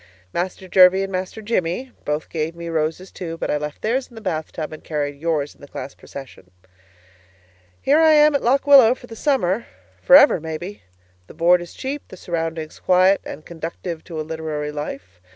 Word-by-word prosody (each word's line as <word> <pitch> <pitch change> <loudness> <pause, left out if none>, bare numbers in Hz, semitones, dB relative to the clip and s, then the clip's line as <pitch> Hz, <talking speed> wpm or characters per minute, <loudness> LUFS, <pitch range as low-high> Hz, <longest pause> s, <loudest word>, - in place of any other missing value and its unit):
Master 185 +2 -3
Jervie 185 +1 +6
and 195 - -5
Master 185 +3 -4
Jimmie 210 +4 -1
both 150 +1 -2
gave 160 0 -3
me 170 0 -6
roses, 160 +3 -2
too, 165 -2 -6
but - - -2
I - - +1
left 150 0 -6
theirs 250 +4 0
in 240 - -18
the - - -8
bath 155 -6 -3
tub 155 -1 -5
and 155 - -10
carried 145 -2 -3
yours 155 -3 -1
in - - -26
the 145 - -11
class 140 - -7
procession. 135 -9 -11 1.3
Here 290 +3 +3
I 320 -1 +6
am 300 0 +6
at 280 - +1
Lock 270 +4 +2
Willow 265 -4 +7
for 245 - -14
the 230 - -10
summer 230 -6 0 0.3
for 270 - +7
ever 285 -9 +7
maybe. 160 +5 -6 0.5
The - - -14
board 175 +2 +4
is 175 - -10
cheap; 280 +2 -4
the 185 - -12
surroundings 165 -2 -4
quiet 185 +2 +4
and 155 - -9
conducive 165 0 -6
to 165 -3 -6
a - - -2
literary 155 -2 -4
life. 135 -11 -7
170 Hz, 195 wpm, -21 LUFS, 155-220 Hz, 1.3 s, Willow